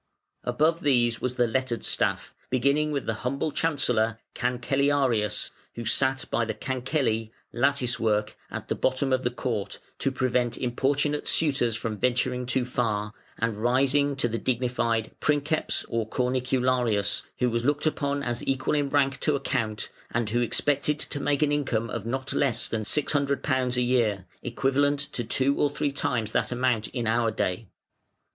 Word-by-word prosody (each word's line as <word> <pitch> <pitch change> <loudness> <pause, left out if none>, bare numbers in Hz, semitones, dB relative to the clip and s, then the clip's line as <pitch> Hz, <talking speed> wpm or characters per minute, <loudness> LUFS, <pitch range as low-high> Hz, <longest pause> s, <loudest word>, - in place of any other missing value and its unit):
Above 155 +7 +2
these 120 -7 +2
was 125 0 -1
the 125 - +3
lettered 125 0 -1
staff, - - 0 0.2
beginning 140 +4 +2
with 140 -2 -2
the 115 - 0
humble 140 +4 -1
chancellor 125 -8 +1 0.2
(Cancellarius), 125 -2 +1 0.2
who 115 - -5
sat 130 +4 +2
by 120 - +2
the 110 - -3
cancelli 130 -4 -1 0.2
(latticework), 120 -5 +1
at - - -6
the - - 0
bottom 130 +1 0
of 130 0 +1
the 120 - +2
Court 120 -4 -3 0.2
(to 135 - +1
prevent 125 -2 0
importunate 140 +4 0
suitors 135 -8 +2
from 110 -1 -4
venturing 125 +1 0
too 130 0 0
far), 105 -4 -1 0.2
and 115 -2 -1
rising 135 +5 +2
to 130 -3 0
the 115 0 -3
dignified 120 -3 0
Princeps 150 +1 0
or 115 -1 -2
Cornicularius, 125 -4 +1 0.2
who 125 -1 +1
was 115 0 0
looked 145 +3 +1
upon 145 -2 0
as 120 -2 -1
equal 135 +1 0
in 145 -2 +1
rank 135 -1 +2
to 150 - +1
a - - -1
Count, 110 -6 -2 0.2
and 115 -3 -1
who 120 +2 +2
expected 145 +4 +1
to 145 - -1
make 145 +1 +1
an 145 - +2
income 115 -6 0
of 115 -1 -4
not 130 +3 -2
less 125 -5 +1
than 110 - -2
£600 140 0 0
a - - +3
year, 115 -6 +1 0.2
equivalent 140 +1 +1
to 120 - -1
two 135 +4 +1
or 145 - +4
three 145 0 -1
times 115 -6 -1
that - - 0
amount 125 -3 +1
in 120 -3 -3
our 115 +1 +2
day. 105 0 -2
125 Hz, 160 wpm, -26 LUFS, 115-140 Hz, 0.2 s, or